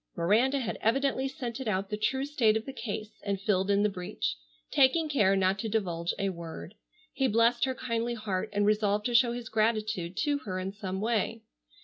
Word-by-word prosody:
Miranda 220 +11 +3
had 255 -5 -3
evidently 270 +3 +1
scented 250 -1 -5
out 195 -1 -1
the - - 0
true 265 +6 0
state 235 -7 +3
of 220 - -6
the 270 - -6
case 215 -3 -6
and 200 -1 -1
filled 195 -1 +1
in 200 0 +3
the - - +4
breach, 180 - -3 0.4
taking 295 +4 +4
care 210 -10 +3
not 190 0 +2
to 220 - -2
divulge 175 -6 -1
a 195 - 0
word. 170 0 -7 0.4
He 270 - +1
blest 235 +2 +3
her 260 -1 -2
kindly 235 -1 -2
heart 205 -4 -3
and 205 0 +1
resolved 210 0 +2
to 245 - 0
show 235 0 +5
his 240 -1 -6
gratitude 215 -5 0
to 290 -1 +1
her 185 -8 -5
in 185 +1 -3
some 190 -2 -4
way. 225 0 -1
215 Hz, 200 wpm, -29 LUFS, 195-240 Hz, 0.4 s, show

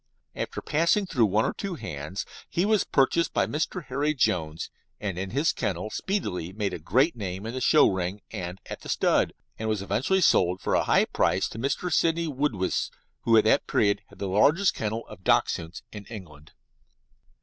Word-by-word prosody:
After - - -4
passing 170 +7 +2
through 125 - +2
one 105 +3 +2
or - - -1
two 195 -3 -4
hands 75 - -5 0.2
he 175 - +1
was 215 -1 +3
purchased 150 +5 +2
by - - +3
Mr. 155 +2 -3
Harry 145 +4 -1
Jones, 80 - 0 0.3
and 100 -4 -3
in 95 0 -3
his 145 +9 +1
kennel 100 +3 -3
speedily 90 - -2
made 100 0 -2
a - - -4
great 130 - +2
name 95 -2 -5
in 115 - -4
the 130 - -4
show 150 +4 +6
ring 95 +1 -2
and 90 -3 -5
at - - -7
the - - -10
stud, - - +2 0.3
and 110 0 -2
was 105 -2 -1
eventually 130 - +1
sold 90 - +3
for - - -2
a - - +2
high - - +4
price - - +1
to 110 - -8
Mr. 150 +7 -1
Sidney 165 0 +2
Woodiwiss, 135 -10 -1 0.4
who 115 -1 +5
at 110 - +6
that 110 - +3
period 100 -1 +2
had - - -18
the 100 - -4
largest 150 - +4
kennel 110 +1 -3
of 105 -3 -12
Dachshunds 85 -1 +1
in 105 -1 -9
England. 80 -9 -11
110 Hz, 190 wpm, -26 LUFS, 95-150 Hz, 0.4 s, show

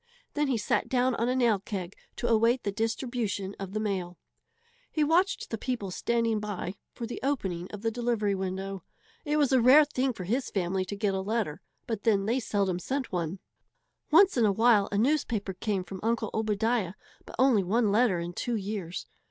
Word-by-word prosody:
Then 295 -1 +1
he 260 -3 +1
sat 210 - 0
down 255 0 +2
on 235 +1 0
a 255 - +1
nail 235 -5 +3
keg 190 -2 -5 0.2
to 240 - -2
await 230 +2 +3
the 200 - -1
distribution 225 -2 -2
of 195 -1 -5
the 215 - -1
mail. 185 -5 -2 0.7
He 310 - +1
watched 350 +6 +1
the 225 - -3
people 235 -7 -3
standing 230 +2 0
by 205 -3 -4 0.2
for 235 - -4
the 235 - -6
opening 190 -11 -2
of 210 0 -8
the 225 - +1
delivery 230 -3 0
window. 190 0 -4 0.4
It 300 0 +1
was 285 -3 +3
a 260 -2 +5
rare 275 +6 +8
thing 265 -2 0
for 205 -6 -7
his 245 +9 -1
family 185 0 -1
to 205 - -5
get 200 -1 0
a 190 - -1
letter, 200 -6 -2 0.2
but 225 -3 -3
then 205 -4 +2
they 235 +5 +1
seldom 195 -6 0
sent 265 +6 -3
one. 175 0 -2 0.7
Once 360 +2 +6
in 235 - +4
a 205 - +4
while 220 -1 +4
a 200 - 0
newspaper 230 -5 +1
came 195 0 -2
from 190 +1 -8
Uncle 225 -1 0
Obadiah, 220 -2 0 0.3
but - - -9
only 255 -5 +4
one 210 +3 +1
letter 215 -3 +3
in 170 +1 -4
two 240 +6 -2
years. 195 -4 -4
215 Hz, 195 wpm, -28 LUFS, 195-245 Hz, 0.7 s, rare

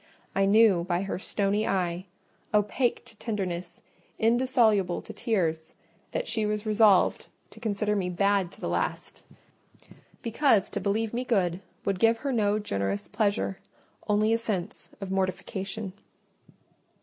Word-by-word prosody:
I 195 0 +2
knew 205 -4 +5
by 175 +1 -1
her 195 -2 -3
stony 205 +2 0
eye—opaque 195 +6 -1
to 225 - -16
tenderness, 185 -6 -4 0.3
indissoluble 225 -6 +3
to - - -10
tears—that 165 -4 -3
she 225 -1 0
was 210 0 -1
resolved 215 -2 +4 0.2
to 220 - -14
consider 210 -2 0
me 185 -3 -1
bad 195 0 +1
to - - -17
the - - -3
last; - - -3 1.0
because 230 -4 +2
to - - -3
believe 215 +2 0
me 245 +2 -1
good 185 -8 +1 0.3
would 195 -2 0
give 230 +2 +4
her 275 - +1
no 210 -4 +2
generous 100 - -2
pleasure: 205 -3 0 0.5
only 215 +1 +3
a 230 - +2
sense 200 -4 -4
of 195 -2 -5
mortification. 190 +1 -2
205 Hz, 130 wpm, -27 LUFS, 185-220 Hz, 1.0 s, knew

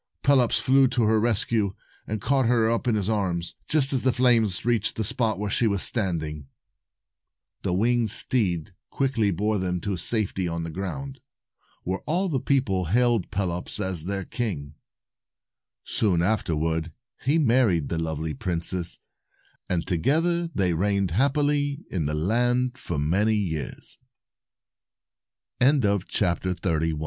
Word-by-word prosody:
Pelops 130 -4 +4
flew 135 0 +4
to 125 -2 0
her 110 0 +3
rescue, 110 -2 0 0.3
and 110 0 -3
caught 130 +3 +1
her 115 -2 +3
up 115 +1 -1
in 115 - +3
his 100 -3 -1
arms, 90 -6 -1 0.2
just 145 -3 +4
as 130 - +2
the 130 - +2
flames 115 -7 +2
reached 115 -3 +1
the 110 - -1
spot 110 0 0
where 105 +1 -3
she 120 +1 +2
was 100 -3 +1
standing. 80 - 0 1.1
The - - -1
winged 115 +3 +2
steed 95 -6 -1 0.2
quickly 130 -6 0
bore 105 +3 0
them 90 -1 -1
in 100 -3 -1
safety 95 -1 +1
to 85 0 -3
the 80 0 -4
ground, 135 - -5 0.6
where 95 +2 -2
all 180 +5 +1
the 140 -5 0
people 120 -10 0
hailed 115 +2 +2
Pelops 90 -1 -2
as 95 -5 -1
their 100 0 -3
king. 85 - -4 1.1
Soon 90 -6 +1
afterward 80 -5 -1 0.3
he 145 +5 +2
married 115 - +2
the 85 - -2
lovely 80 -1 -3
princess, 85 +3 -2 0.7
and 85 -2 -1
together 165 - +1
they 95 - 0
reigned 100 +1 0
hap 135 - +2
pily 145 0 0
in 80 -6 -1
the 75 - -2
land 120 +9 +1
for 85 -9 -5
many 95 +9 +2
years. 80 -9 -3 1.6
267 100 - +1
A 80 -2 0
MIRACLE. 80 -2 -2
105 Hz, 145 wpm, -25 LUFS, 90-125 Hz, 1.6 s, Pelops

